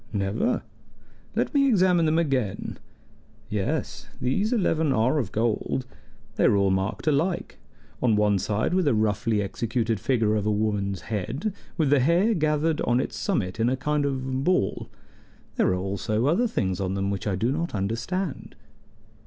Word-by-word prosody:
"Never. 105 Hz, -, 0 dB, 0.7 s
Let -, -, 0 dB
me 280 Hz, -1 st, +4 dB
examine 180 Hz, -6 st, +4 dB
them 155 Hz, +1 st, +2 dB
again. 135 Hz, -, -1 dB, 0.7 s
Yes, 105 Hz, -2 st, -3 dB
these 195 Hz, -, 0 dB
eleven 160 Hz, -, +1 dB
are 130 Hz, +4 st, +2 dB
of 115 Hz, -9 st, -3 dB
gold. 115 Hz, +3 st, -1 dB, 0.5 s
They -, -, +3 dB
are 115 Hz, -, +5 dB
all 100 Hz, -1 st, +3 dB
marked 95 Hz, +2 st, -1 dB
alike, 160 Hz, +4 st, 0 dB, 0.4 s
on 115 Hz, -4 st, +3 dB
one 105 Hz, -1 st, +3 dB
side 105 Hz, -, -1 dB
with 185 Hz, -4 st, +2 dB
a 135 Hz, -, +3 dB
roughly 110 Hz, 0 st, +1 dB
executed 115 Hz, +2 st, -1 dB
figure 110 Hz, -4 st, +1 dB
of 105 Hz, -1 st, -1 dB
a -, -, +3 dB
woman's 105 Hz, -3 st, -1 dB
head, 115 Hz, -, -3 dB, 0.2 s
with 155 Hz, -5 st, +2 dB
the 145 Hz, -, +5 dB
hair 170 Hz, -, +3 dB
gathered 155 Hz, -2 st, +1 dB
on 120 Hz, +1 st, +2 dB
its -, -, -3 dB
summit 110 Hz, -, -2 dB
in 115 Hz, +2 st, +3 dB
a 130 Hz, -, 0 dB
kind 150 Hz, +3 st, 0 dB
of 130 Hz, -1 st, -2 dB
ball. 180 Hz, -, 0 dB, 0.7 s
There -, -, +3 dB
are 95 Hz, -, +2 dB
also 100 Hz, +5 st, -1 dB
other 180 Hz, -, +3 dB
things 95 Hz, -, -1 dB
on 95 Hz, 0 st, -1 dB
them 100 Hz, 0 st, -1 dB
which 100 Hz, +1 st, -3 dB
I 100 Hz, -, +1 dB
do 115 Hz, +7 st, 0 dB
not 165 Hz, -2 st, -2 dB
understand." 120 Hz, -, -3 dB
120 Hz, 165 wpm, -25 LUFS, 105-155 Hz, 0.7 s, are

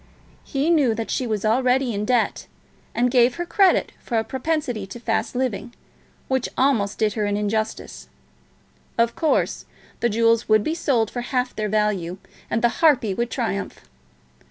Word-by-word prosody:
He 285 Hz, +4 st, 0 dB
knew 275 Hz, -9 st, +3 dB
that 225 Hz, 0 st, -4 dB
she 255 Hz, -, -1 dB
was 215 Hz, -2 st, -2 dB
already 250 Hz, +2 st, +2 dB
in 205 Hz, +1 st, -2 dB
debt, 245 Hz, -1 st, 0 dB, 0.5 s
and 245 Hz, +1 st, +2 dB
gave 245 Hz, 0 st, +4 dB
her 345 Hz, -, -3 dB
credit 380 Hz, +1 st, +3 dB
for 235 Hz, -, -2 dB
a 220 Hz, -, +2 dB
propensity 255 Hz, -4 st, -2 dB
to 215 Hz, +5 st, -9 dB
fast 225 Hz, 0 st, -1 dB
living 245 Hz, -2 st, -2 dB, 0.5 s
which 260 Hz, -2 st, 0 dB
almost 230 Hz, -7 st, +2 dB
did 215 Hz, -2 st, +1 dB
her 210 Hz, -1 st, -1 dB
an 205 Hz, 0 st, 0 dB
injustice. 215 Hz, +1 st, -3 dB, 0.9 s
Of 230 Hz, 0 st, +2 dB
course, 320 Hz, -2 st, 0 dB, 0.3 s
the 235 Hz, -, +1 dB
jewels 230 Hz, +1 st, +2 dB
would 215 Hz, -1 st, +5 dB
be 315 Hz, -, -1 dB
sold 250 Hz, -9 st, 0 dB
for 245 Hz, -, -3 dB
half 250 Hz, +1 st, -2 dB
their 215 Hz, -1 st, -2 dB
value, 200 Hz, -4 st, 0 dB, 0.3 s
and 225 Hz, -, -1 dB
the 235 Hz, -, +5 dB
harpy 260 Hz, -11 st, +4 dB
would 235 Hz, +4 st, -2 dB
triumph. 225 Hz, -5 st, -3 dB
235 Hz, 165 wpm, -23 LUFS, 215-260 Hz, 0.9 s, would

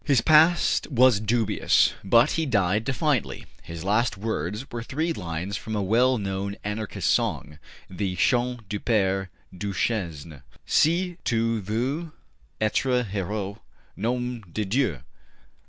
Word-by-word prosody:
His 140 Hz, -6 st, +3 dB
past 160 Hz, +3 st, +4 dB
was 130 Hz, -5 st, +5 dB
dubious, 110 Hz, 0 st, +2 dB
but 115 Hz, +8 st, +4 dB
he 160 Hz, -2 st, -1 dB
died 105 Hz, -2 st, +1 dB
defiantly; 135 Hz, -2 st, -1 dB, 0.2 s
his 85 Hz, -1 st, -8 dB
last 105 Hz, +2 st, +1 dB
words 105 Hz, -, -3 dB
were 120 Hz, -, -4 dB
three 155 Hz, +8 st, -2 dB
lines 90 Hz, -, -4 dB
from 110 Hz, -, -5 dB
a 105 Hz, -, 0 dB
well 125 Hz, +6 st, +3 dB
known 100 Hz, 0 st, -3 dB
Anarchist 105 Hz, 0 st, -2 dB
song, 75 Hz, 0 st, -2 dB, 0.3 s
the 95 Hz, 0 st, -3 dB
``Chant 125 Hz, +5 st, +1 dB
du 105 Hz, +1 st, -3 dB
Pere 95 Hz, -4 st, 0 dB, 0.3 s
Duchesne'': 85 Hz, -, -3 dB, 0.2 s
Si 175 Hz, +3 st, +2 dB
tu 115 Hz, -1 st, 0 dB
veux 130 Hz, -, -2 dB, 0.5 s
etre 125 Hz, +3 st, +1 dB
heureux, 100 Hz, 0 st, -4 dB, 0.4 s
Nom 125 Hz, +2 st, -2 dB
de 105 Hz, +4 st, -2 dB
Dieu! 100 Hz, -, 0 dB
110 Hz, 125 wpm, -25 LUFS, 95-125 Hz, 0.5 s, was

